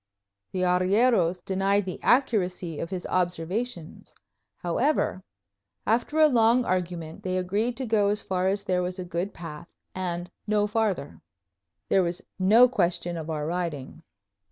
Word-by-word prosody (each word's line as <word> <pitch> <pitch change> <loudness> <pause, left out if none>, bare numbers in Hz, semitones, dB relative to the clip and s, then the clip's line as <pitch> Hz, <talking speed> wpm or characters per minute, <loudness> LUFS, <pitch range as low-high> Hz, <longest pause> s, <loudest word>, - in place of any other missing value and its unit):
The 185 - -2
arrieros 185 0 +2
denied 195 +1 +1
the 185 - -6
accuracy 185 - +1
of 165 - -4
his 185 -2 -5
observations. 180 +2 -3 0.4
However, 185 - 0 0.6
after 240 +7 +1
a 315 - +7
long 240 -2 +4
argument, 175 -3 -3
they 185 0 -2
agreed 205 +6 -1
to 260 - -3
go 215 -3 +2
as 210 +1 -1
far 185 0 0
as 200 +1 0
there 185 -3 0
was 180 +1 -3
a 185 - -5
good 175 +3 -3
path, 165 -1 -9 0.3
and 175 -1 -4 0.2
no 210 -1 +2
farther. 210 -8 -1 0.7
There 190 - +4
was 175 0 -2 0.2
no 220 +7 +7
question 175 -6 -1
of 160 -1 -6
our 150 -2 -2
riding. 165 -3 -4
185 Hz, 145 wpm, -26 LUFS, 175-210 Hz, 0.7 s, a